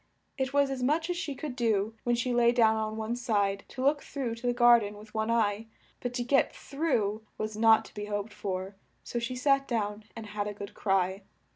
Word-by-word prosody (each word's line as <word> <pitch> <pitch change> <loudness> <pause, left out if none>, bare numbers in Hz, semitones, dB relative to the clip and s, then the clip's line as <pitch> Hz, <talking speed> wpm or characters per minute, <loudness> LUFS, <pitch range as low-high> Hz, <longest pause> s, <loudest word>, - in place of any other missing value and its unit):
It 265 -1 -1
was 280 -1 +3
as 265 -1 -3
much 315 +7 +1
as - - -1
she 295 -5 -3
could 280 -2 -5
do, 220 -3 +1
when 240 0 +3
she 245 +1 -1
lay 240 0 +5
down 225 -2 +4
on 220 0 -2
one 220 +2 -2
side, 205 -5 0
to 260 - -6
look 285 +1 +3
through 260 -5 -4
to 230 +2 -5
the - - +4
gar 240 0 +7
den 205 -1 -6
with 210 0 -14
one 220 0 -1
eye: 220 -1 +1 0.3
but 245 - -3
to 245 - 0
get 270 +3 +2
through 245 -8 -1 0.2
was 215 0 -3
not 225 0 +5
to - - -14
be 210 0 -5
hoped 205 +1 -3
for, 190 -1 -4 0.3
so 240 - -3
she 235 +2 -3
sat 275 +1 +2
down 210 -2 -2
and 225 - -7
had 205 0 -3
a 205 - -5
good 200 0 -8
cry. 190 -1 0
225 Hz, 230 wpm, -29 LUFS, 210-250 Hz, 0.3 s, gar